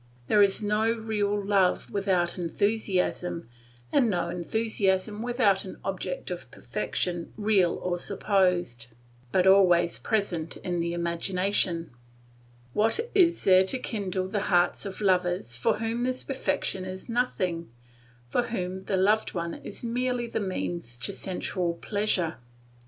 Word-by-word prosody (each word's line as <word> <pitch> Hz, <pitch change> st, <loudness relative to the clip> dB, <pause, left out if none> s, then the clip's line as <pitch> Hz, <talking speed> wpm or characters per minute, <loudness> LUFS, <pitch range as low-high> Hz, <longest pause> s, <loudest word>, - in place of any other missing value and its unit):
There 210 Hz, -, +5 dB
is 200 Hz, +1 st, +3 dB
no 210 Hz, +2 st, +2 dB
real 215 Hz, -3 st, -1 dB
love 195 Hz, -2 st, +1 dB
without 185 Hz, -3 st, 0 dB
enthusiasm, 180 Hz, -, -1 dB, 0.4 s
and 250 Hz, -5 st, +4 dB
no 175 Hz, -3 st, 0 dB
enthusiasm 200 Hz, +2 st, 0 dB
without 235 Hz, -5 st, +2 dB
an 190 Hz, -, -8 dB
object 185 Hz, -1 st, -4 dB
of 175 Hz, -8 st, -6 dB
perfection 175 Hz, +2 st, -3 dB
real 205 Hz, -5 st, +3 dB
or 175 Hz, -1 st, -2 dB
supposed, 180 Hz, -, +1 dB, 0.4 s
but 185 Hz, -1 st, +3 dB
always 180 Hz, -3 st, +5 dB
present 185 Hz, -7 st, -1 dB
in 175 Hz, -1 st, -3 dB
the 170 Hz, 0 st, -1 dB
imagination. 170 Hz, 0 st, 0 dB, 0.8 s
What 225 Hz, -, +2 dB
is 350 Hz, -4 st, +4 dB
there 185 Hz, -1 st, +6 dB
to 260 Hz, -, +1 dB
kindle 195 Hz, -6 st, -3 dB
the 205 Hz, +2 st, -1 dB
hearts 175 Hz, +3 st, +2 dB
of 195 Hz, +2 st, -7 dB
lovers 180 Hz, -, +1 dB
for 125 Hz, -, +1 dB
whom 225 Hz, +2 st, -2 dB
this 255 Hz, +1 st, -1 dB
perfection 195 Hz, -7 st, -1 dB
is 185 Hz, 0 st, -7 dB
nothing, 185 Hz, -, -1 dB, 0.6 s
for 240 Hz, -, 0 dB
whom 190 Hz, -4 st, -4 dB
the 195 Hz, -, 0 dB
loved 210 Hz, +3 st, +2 dB
one 170 Hz, -1 st, -2 dB
is -, -, -7 dB
merely 245 Hz, +1 st, -1 dB
the 230 Hz, -, -3 dB
means 175 Hz, -, -3 dB
to 120 Hz, -, -3 dB
sensual 180 Hz, -2 st, -2 dB
pleasure? 195 Hz, -4 st, -1 dB
190 Hz, 135 wpm, -27 LUFS, 175-215 Hz, 0.8 s, there